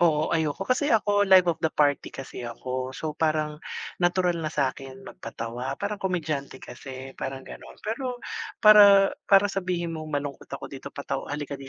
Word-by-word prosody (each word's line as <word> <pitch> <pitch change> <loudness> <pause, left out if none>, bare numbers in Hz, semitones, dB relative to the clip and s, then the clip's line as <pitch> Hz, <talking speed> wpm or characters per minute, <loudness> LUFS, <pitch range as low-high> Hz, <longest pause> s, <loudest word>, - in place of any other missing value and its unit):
oo, 155 -3 +2
ayoko. 160 +2 0
Kasi 255 +7 +1
ako 205 -3 +3
live 190 -1 +8
of 170 -2 0
the 160 - +2
party 145 -2 +1
kasi 135 - -8
ako. 125 +2 -4
So, 155 -1 -3
parang 155 -1 -1 0.4
natural 175 0 +2
na 155 - -2
sakin 135 -2 -3
magpatawa, 115 +3 -6
parang 205 0 -4
komedyante 155 -8 -2
kasi 130 +1 -9
parang 135 0 -5
ganon. - - -11
Pero, 250 +3 -3 0.5
para 200 -2 +8 0.2
para 195 0 +7
sabihin 180 -3 -2
mong 155 -1 -6
malungkot 145 -2 -4
ako - - -7
dito - - -7
pataw - - -5
halika 145 0 -4
di 135 - -9
155 Hz, 165 wpm, -26 LUFS, 135-190 Hz, 0.5 s, live